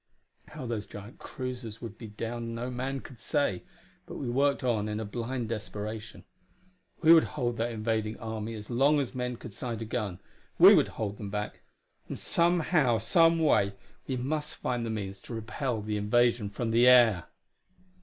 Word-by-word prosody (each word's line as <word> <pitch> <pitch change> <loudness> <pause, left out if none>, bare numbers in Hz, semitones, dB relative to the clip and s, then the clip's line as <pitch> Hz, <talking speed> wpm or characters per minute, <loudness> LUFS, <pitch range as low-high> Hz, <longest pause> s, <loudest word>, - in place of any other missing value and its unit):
How 150 -4 -8
those 115 -3 -3
giant 105 +4 -10
cruisers 125 -4 -6
would 115 -2 -8
be 115 - -7
downed 115 +2 -5
no 120 +2 -4
man 130 +2 -3
could 125 - -13
say, 145 - 0 0.5
but - - -7
we 135 - -4
worked 140 +3 +1
on 110 -4 0
in 105 0 -2
a 110 - -3
blind 120 +3 -3
desperation; 105 -2 -5 0.8
we 165 +1 +9
would 165 - +6
hold 120 -3 -1
that 115 +1 -1
invading 110 -1 -1
army 110 0 -5
as 105 +2 -8
long 140 +5 +4
as 135 -2 -2
men 125 -1 -2
could 115 -2 -10
sight 115 0 -4
a 115 - -4
gun; 105 -5 -3 0.4
we - - +10
would - - +5
hold 105 -2 -3
them 100 - -5
back; 105 +1 -4 0.5
and - - -5
somehow, 170 -7 +2
someway, 155 - +3 0.3
we 130 - -1
must 150 +4 -2
find 120 -2 -2
the - - -3
means 100 -3 -4
to 120 - -7
repel 115 +1 -3
the 105 0 -2
invasion 115 +1 +2
from 115 +3 -3
the 120 +2 +5
air! 120 -8 +6
115 Hz, 175 wpm, -29 LUFS, 110-125 Hz, 0.8 s, we